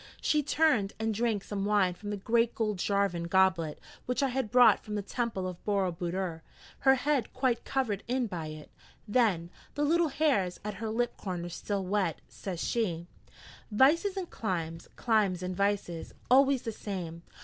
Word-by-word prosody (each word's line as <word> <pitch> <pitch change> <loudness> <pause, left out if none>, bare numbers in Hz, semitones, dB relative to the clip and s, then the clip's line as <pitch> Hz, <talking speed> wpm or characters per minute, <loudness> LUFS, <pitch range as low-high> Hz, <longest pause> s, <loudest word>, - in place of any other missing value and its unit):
She 300 - +2
turned 280 -9 +2
and 220 0 0
drank 220 -2 0
some 200 -2 -3
wine 200 -3 +3
from 205 +3 -8
the 205 - -2
great 230 +3 +1
gold 215 -4 -1
Jarvan 200 -4 0
goblet 185 -4 +2 0.3
which 250 +3 0
I 275 - +2
had 255 -3 -2
brought 240 -4 +6
from 210 - -5
the 205 - -2
temple 220 -4 -2
of 180 -2 -7
Boro 195 -3 +1
Budor, 175 0 -3 0.4
her 265 0 +5
head 265 -2 0
quite 255 -2 0
covered 230 -7 -1
in 250 +1 +1
by 175 -7 -5
it. 155 -1 -9 0.4
Then, 205 -7 +2 0.2
the 290 - 0
little 335 +2 +3
hairs 265 - +1
at 210 - -2
her 225 - -2
lip 240 +2 -1
corners 175 -3 -5
still 195 +2 -3
wet, 190 -4 0
says 185 -4 -6
she: 175 -8 -1 0.7
'Vices 330 - +4
and 370 -2 -3
climes, 165 - -4
climes 205 -6 +1
and 180 0 -3
vices. 200 -4 -1 0.2
Always 270 0 +5
the 225 - -3
same. 180 -6 -6
205 Hz, 170 wpm, -30 LUFS, 185-245 Hz, 0.7 s, brought